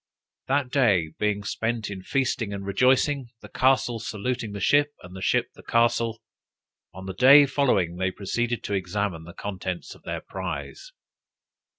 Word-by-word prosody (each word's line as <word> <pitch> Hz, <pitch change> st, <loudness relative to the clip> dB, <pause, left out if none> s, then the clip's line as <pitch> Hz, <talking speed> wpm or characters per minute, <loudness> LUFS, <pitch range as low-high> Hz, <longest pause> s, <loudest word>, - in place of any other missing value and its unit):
That 135 Hz, -1 st, 0 dB
day 100 Hz, -, +3 dB
being 105 Hz, -1 st, 0 dB
spent 110 Hz, +1 st, -2 dB
in 95 Hz, -2 st, -6 dB
feasting 125 Hz, -1 st, -1 dB
and 100 Hz, -1 st, -5 dB
rejoicing, 130 Hz, +5 st, +2 dB
the -, -, -12 dB
castle 130 Hz, -2 st, +2 dB
saluting 110 Hz, +1 st, -3 dB
the 100 Hz, -, -6 dB
ship, 145 Hz, +5 st, +3 dB
and 90 Hz, +1 st, -11 dB
the 95 Hz, -, -8 dB
ship -, -, +1 dB
the -, -, -15 dB
castle, 115 Hz, -1 st, +1 dB, 0.7 s
on 95 Hz, 0 st, -10 dB
the 95 Hz, -, -5 dB
day 135 Hz, +7 st, +8 dB
following 100 Hz, -, +1 dB
they 95 Hz, 0 st, 0 dB
proceeded 120 Hz, +5 st, -2 dB
to -, -, -3 dB
examine 95 Hz, -3 st, -2 dB
the 85 Hz, -, -11 dB
contents 95 Hz, -3 st, -5 dB
of -, -, -18 dB
their -, -, -5 dB
prize. -, -, -6 dB
110 Hz, 160 wpm, -25 LUFS, 95-125 Hz, 0.7 s, day